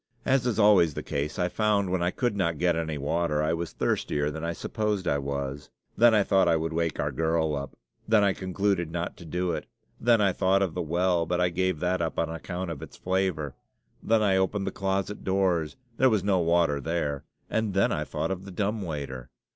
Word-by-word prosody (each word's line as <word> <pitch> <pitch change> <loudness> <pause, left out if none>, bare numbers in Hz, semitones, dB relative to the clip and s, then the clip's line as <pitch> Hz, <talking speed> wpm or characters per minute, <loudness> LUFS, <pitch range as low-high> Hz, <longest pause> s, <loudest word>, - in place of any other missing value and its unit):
As 130 -2 +2
is 120 - 0
always 100 -8 +5
the - - -4
case, 70 +2 -3
I 90 - +1
found, 100 -1 +1
when 90 -1 0
I 90 - +2
could 120 +2 -1
not 85 -5 0
get 85 +1 +2
any 80 -2 -2
water, 75 +1 0
I 80 +1 +1
was 85 0 -3
thirstier 75 0 -1
than 80 +1 -6
I 85 - -1
supposed 105 +1 -2
I 70 - +2
was. 70 0 -4 0.3
Then 115 0 +6
I 105 - +4
thought 95 -2 +3
I 85 - +4
would 80 +1 -2
wake 85 -1 -1
our - - 0
girl 80 -1 0
up. 70 -1 -6 0.3
Then 110 -2 +4
I 100 -1 +3
concluded 95 -2 -1
not 85 +1 -3
to 85 - -11
do 90 +3 -1
it. - - -4 0.3
Then 115 -1 +4
I 100 -3 +3
thought 95 +1 +2
of 90 -4 -2
the 90 - -2
well, 85 +1 +1
but 90 +1 0
I 90 0 +3
gave 90 -1 0
that 90 0 0
up 80 - -2
on 80 -1 0
account 90 +2 -5
of 75 - -7
its - - -10
flavor. 90 -7 -1 0.5
Then 110 -1 +2
I 95 -2 +3
opened 95 +1 0
the - - -2
closet 95 +1 -2
doors: 95 -5 +1 0.2
there 130 - +5
was 105 -6 +1
no 100 -2 +2
water 85 -4 +2
there; 75 -3 -2 0.2
and 110 -3 -1
then 95 - +3
I - - -1
thought - - -3
of 95 0 -4
the 100 - -9
dumb 105 +3 -1
waiter! 70 -7 -5
90 Hz, 225 wpm, -27 LUFS, 80-95 Hz, 0.5 s, Then